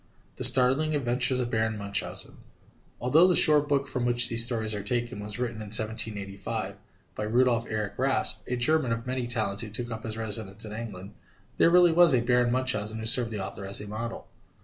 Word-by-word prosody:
THE - - -5
STARTLING 135 +5 +5
ADVENTURES 125 -1 0
OF 120 -1 -3
BARON 110 -1 -1
MUNCHAUSEN 100 -1 -5 0.6
_Although 155 +9 +4
the 180 - +2
short 150 -2 +5
book 140 -1 0
from 125 -2 -3
which 120 0 +3
these 115 0 +4
stories 110 -3 -1
are 105 - -4
taken 120 +1 -3
was 105 0 -3
written 120 -2 -4
in 110 -1 -8
1785 105 -3 -1 0.3
by - - -5
Rudolf 120 +1 +1
Erich 110 -1 -5
Raspe, 135 +1 +1
a 125 - -2
German 125 0 +1
of 115 0 -6
many 125 -1 -3
talents 110 -4 0
who 110 - -6
took 120 +2 -4
up 110 -1 -6
his 110 0 -6
residence 110 -2 -3
in 105 - -8
England, 105 -3 -8 0.4
there - - +4
really 175 0 +5
was 165 -4 +5
a 120 - +1
Baron 125 0 +1
Munchausen 110 -4 -1
who 110 - -6
served 120 +1 +4
the 105 -4 -5
author 100 - -9
as 95 +1 -3
a 105 - -8
model. 110 +2 -7
115 Hz, 200 wpm, -26 LUFS, 110-125 Hz, 0.6 s, STARTLING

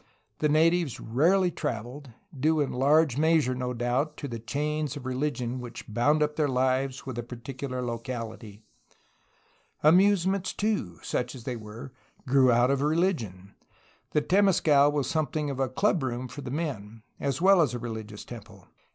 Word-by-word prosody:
The 150 - +2
natives 165 -1 +2
rarely 175 +10 +2
traveled, 125 +2 -5 0.3
due 155 +4 +2
in 145 - 0
large 145 +1 +3
measure, 160 -4 +3
no 125 0 -3
doubt, 125 +5 -1
to 140 - -5
the 115 -3 -5
chains 150 +4 -2
of 135 - -9
religion 130 -2 -2
which 120 -1 -8
bound 145 +8 +2
up 150 0 -2
their 150 -2 +2
lives 130 0 0
with 130 -3 -5
a - - -1
particu 125 +3 -7
lar 125 0 -3
locality. 115 -3 -6 1.2
Amusements, 190 +3 +4
too, 200 - -1
such 125 +1 -2
as 125 - -10
they 125 0 -3
were, 110 +3 -9 0.3
grew 130 -1 +5
out 120 +2 +4
of 140 -1 +1
religion. 145 - -1 0.6
The 150 - +1
temescal 165 -7 +4
was 145 -3 -1
something 150 -1 -1
of 135 - -6
a 135 -1 +1
club 180 +6 +1
room 130 -1 -3
for 145 - -9
the 130 - -6
men, 115 -8 -4 0.2
as 140 0 -1
well 190 0 +6
as 130 -6 +1
a - - -2
religious 110 -3 -7
temple. 105 -5 -11
135 Hz, 165 wpm, -27 LUFS, 120-155 Hz, 1.2 s, well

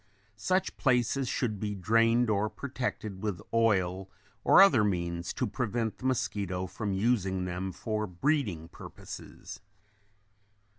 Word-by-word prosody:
Such 185 - 0
places 125 0 +2
should 110 -6 -1
be 105 0 -3
drained 115 +5 +3
or 105 +1 +1
protected 110 -4 -4
with 105 -4 -2
oil 95 -5 +2 0.3
or - - +6
other 155 - +7
means 85 -3 -1
to 125 - -1
prevent 115 -1 -2
the 130 - -8
mosquito 100 -7 -1
from 100 +3 -4
using 95 -3 +1
them 90 +1 -3
for 105 +3 -3
breeding 95 - -1
purposes. - - -10
105 Hz, 120 wpm, -30 LUFS, 95-120 Hz, 0.3 s, other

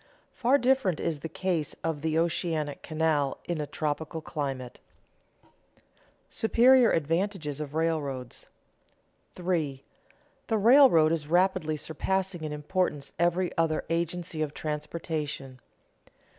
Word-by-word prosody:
Far 255 +3 +3
different 250 - +2
is 160 -3 -2
the 165 - -6
case 170 -2 -2
of 160 -3 -2
the 160 0 0
oceanic 160 -3 -1
canal 155 -3 0
in 170 -3 -2
a 150 - -4
tropical 155 +2 -3
climate. 135 -5 -5 0.6
[Sidenote: - - -34 0.3
Superior 245 +2 +5
advantages 165 -1 -1
of 150 0 -6
railroads] 145 -6 -2 0.9
3. 165 -7 -2 0.6
_The 220 -3 0
railroad 235 - +7
is 160 -3 -1
rapidly 170 -2 +2
surpassing 185 +3 -2
in 155 - -3
importance 150 -1 -2
every 175 +1 +1
other 160 -1 +1
agency 170 -1 -2
of 150 -1 -2
transportation. 150 -3 -4
160 Hz, 115 wpm, -28 LUFS, 150-180 Hz, 0.9 s, railroad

